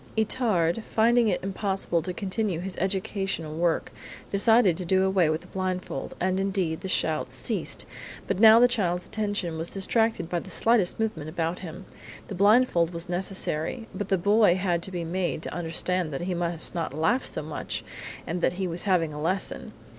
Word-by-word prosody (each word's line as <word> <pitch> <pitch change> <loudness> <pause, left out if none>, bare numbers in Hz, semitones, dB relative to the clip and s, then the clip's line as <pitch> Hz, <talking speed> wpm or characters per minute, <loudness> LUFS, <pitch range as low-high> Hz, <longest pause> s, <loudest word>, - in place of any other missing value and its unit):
Itard, 220 -4 +1
finding 235 +1 +3
it 185 -4 0
impossible 190 -3 -1
to 180 - -4
continue 195 -1 -2
his 185 +1 -5
educational 190 -4 -2
work, 170 0 0 0.4
decided 205 -2 +5
to 185 - -2
do 190 +2 +2
away 190 -4 +3
with 155 +1 -1
the - - -15
blindfold, 185 -6 -4
and, 185 +1 +1
indeed, 190 -5 -1
the - - -4
shouts 160 -4 0
ceased, - - -3 0.4
but - - -1
now 220 +1 +9
the 245 - +7
child's 180 -7 0
attention 205 -6 -2
was 165 - -3
distracted 220 -2 0
by 175 0 -1
the - - -10
slightest 225 -5 +2
movement 170 -9 -2
about 165 +1 -2
him. 180 +1 -8 0.4
The - - -4
blindfold 200 -4 +4
was 170 +1 -6
necessary, 185 +3 -2
but 205 - -4
the 195 - +3
boy 205 0 +4
had 180 -2 0
to 190 - -6
be 175 -2 -3
made 175 -1 -2
to - - -5
understand 175 +1 -2
that 135 - -3
he 180 +1 -2
must 170 -1 -2
not 165 -5 -3
laugh 165 - +1
so - - -3
much - - -4 0.4
and 175 +2 -3
that - - +2
he 190 +1 -2
was 170 +2 -2
having 170 -6 +2
a 150 - -6
lesson. 185 +5 -2
185 Hz, 185 wpm, -26 LUFS, 170-200 Hz, 0.4 s, now